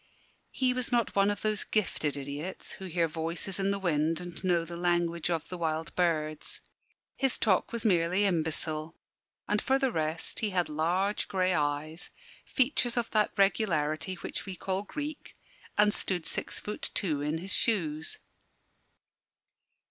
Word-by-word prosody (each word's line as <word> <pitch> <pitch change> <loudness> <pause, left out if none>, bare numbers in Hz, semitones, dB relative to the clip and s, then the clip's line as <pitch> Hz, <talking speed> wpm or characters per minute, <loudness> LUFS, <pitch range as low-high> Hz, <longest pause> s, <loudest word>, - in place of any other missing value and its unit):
He 255 -1 +1
was 255 0 -2
not 240 -2 +1
one 200 0 +5
of 205 - -2
those 215 -1 +1
gifted 155 -9 0
idiots 145 +6 -5
who 190 - -7
hear 170 -2 +1
voices 165 +4 -2
in 195 0 +1
the 200 - +1
wind 165 -3 +1
and 175 0 -7
know 175 -2 +2
the 170 +1 -7
language 170 -1 +1
of 165 -3 -1
the 180 - -5
wild 160 -1 -1
birds. 155 -4 0 0.6
His 270 -2 +1
talk 195 -5 +2
was 235 0 -3
merely 180 0 +3
imbecile; 160 -2 0 0.5
and, 210 - +2
for 265 0 +3
the 270 -2 +1
rest, 160 -2 -2
he 215 - 0
had 180 -3 0
large 175 +7 +1
grey 185 -1 +2
eyes, 150 +2 -1 0.3
features 250 -3 +1
of 235 -1 0
that 215 -1 +3
regularity 185 -4 +2
which - - -5
we 190 - -4
call 190 +1 -1
Greek, 295 +8 -6 0.4
and 210 0 +5
stood 180 -4 -1
six - - -1
foot 210 - -4
two 155 -7 +2
in 150 +2 0
his 185 +3 -3
shoes. 160 -8 0
180 Hz, 155 wpm, -30 LUFS, 160-205 Hz, 0.6 s, one